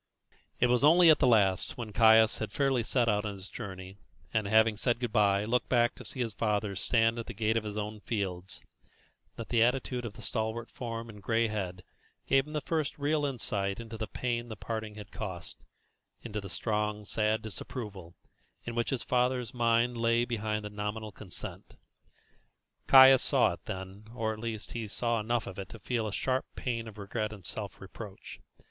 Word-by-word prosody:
It - - +5
was 125 +1 +3
only 165 +2 +8
at 155 - +4
the - - +4
last, 100 -6 +3
when 115 -4 -6
Caius 110 0 +6
had 110 -2 -3
fairly 135 -1 +2
set 120 +1 +1
out 105 -2 +2
on 105 -2 -4
his 95 0 -9
journey, 95 -3 -8 0.4
and, 110 -3 +1
having 110 +1 +4
said 120 +3 0
good 120 -3 -2
bye, 100 -2 +3
looked 125 +3 0
back 120 -1 +3
to - - -11
see 130 - -6
his 115 -3 -2
father 105 -1 0
stand 115 +3 +2
at 115 - -6
the 120 - -7
gate 110 +2 +1
of 115 - +1
his 105 0 -5
own 105 0 -4
fields, 95 -4 -4 0.7
that 115 - -7
the 120 -2 +3
attitude 125 +1 +1
of 115 -3 -5
the 115 0 -11
stalwart 110 +3 -3
form 115 -2 -5
and 105 -2 -11
gray 115 +2 +1
head 90 -4 -4 0.4
gave 135 +1 +3
him 150 - -7
his 150 - -1
first 155 -4 -1
real 145 +1 +1
insight 100 -6 -2
into 115 -1 -7
the 110 -1 -4
pain 120 +1 -2
the 110 - -5
parting 110 0 -5
had 105 -1 -10
cost 95 -5 -6 0.6
into 105 -3 -4
the 100 - -8
strong, 105 0 -2
sad 110 +1 0
disapproval 105 -5 -7 0.5
which 120 0 -1
in 135 - +1
the - - -6
father's 125 0 +1
mind 120 0 +2
lay 115 +1 +2
behind 110 -2 -2
the 105 - -6
nominal 105 +1 -4
consent. 100 -2 -8 1.1
Caius 130 -1 +9
saw - - +3
it - - -12
then, 95 +2 -7
or, 110 -2 -1
at 110 - -9
least, 110 -2 -5
he 115 -2 -4
saw 115 +2 -1
enough 115 +2 0
of 95 - -7
it 95 -2 -6
to - - -9
feel 115 -3 -2
a - - -3
sharp 130 +5 -1
pang 115 -3 -3
of 110 -1 -10
regret 105 +1 -3
and 100 -5 -11
self - - -6
reproach. - - -10
110 Hz, 195 wpm, -30 LUFS, 105-120 Hz, 1.1 s, Caius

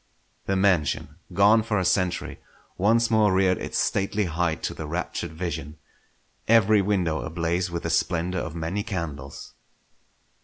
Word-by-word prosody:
The 95 - +1
mansion, 95 -7 +1
gone 105 +3 +5
for 110 -1 -1
a 95 - 0
century, 90 0 0 0.4
once 115 +4 +2
more 110 -2 +4
reared 95 -1 +2
its - - -4
stately 100 +1 0
height 80 -3 -1
to - - -2
the - - -7
raptured - - -4
vision; 80 -3 -5 0.7
every 110 -2 +5
window 90 -6 0
ablaze 85 +2 -1
with 85 -1 -4
the - - -2
splendour 90 0 0
of 80 - -6
many 85 +5 -2
candles. 85 -10 -6
90 Hz, 145 wpm, -25 LUFS, 85-100 Hz, 0.7 s, gone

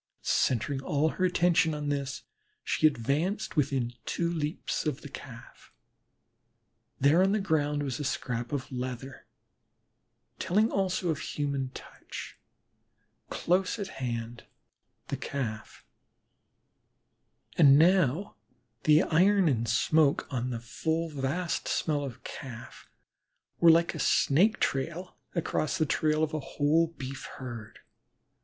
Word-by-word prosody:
Centring 135 +3 +1
all 145 +3 +1
her 185 - 0
attention 165 -3 +3
on 150 -1 -3
this, 140 -2 -3 0.4
she 155 - +3
advanced 150 - -1
within 135 -5 0
two 170 0 -1
leaps 155 -1 -2
of 145 -2 -2
the 145 - -9
Calf. 120 -3 -12 1.3
There 145 +6 +5
on 195 +1 +3
the 215 - +2
ground 150 -6 0
was 135 -2 -3
a - - -2
scrap 120 -3 -3
of 140 -2 -3
leather, 130 +1 -6 1.1
telling 210 +5 +2
also 185 -2 0
of 155 -2 0
a - - -7
human 140 -3 -2
touch, - - -9 0.9
close 185 +4 0
at 200 -3 -4
hand 120 -1 -4 0.6
the - - -2
Calf, 110 -6 -5 1.7
and 140 -4 +7
now 170 - +3 0.5
the 155 +3 +6
iron 190 +3 +4
and 115 -5 +1
smoke 145 +5 +3
on 125 0 -1
the 120 -2 -3
full 160 +8 -2
vast 150 +5 -2
smell 150 -3 0
of 130 -4 -7
Calf 120 -4 -9 0.7
were 170 - +7
like 165 +1 +5
a 160 - -6
snake 195 +13 +3
trail 170 +7 -2 0.2
across 160 -2 -1
the 155 - +2
trail 155 +1 +1
of 155 - -1
a 155 - -1
whole 150 +4 +2
Beef 135 -5 -7
herd. 120 -4 -8
150 Hz, 125 wpm, -29 LUFS, 130-165 Hz, 1.7 s, and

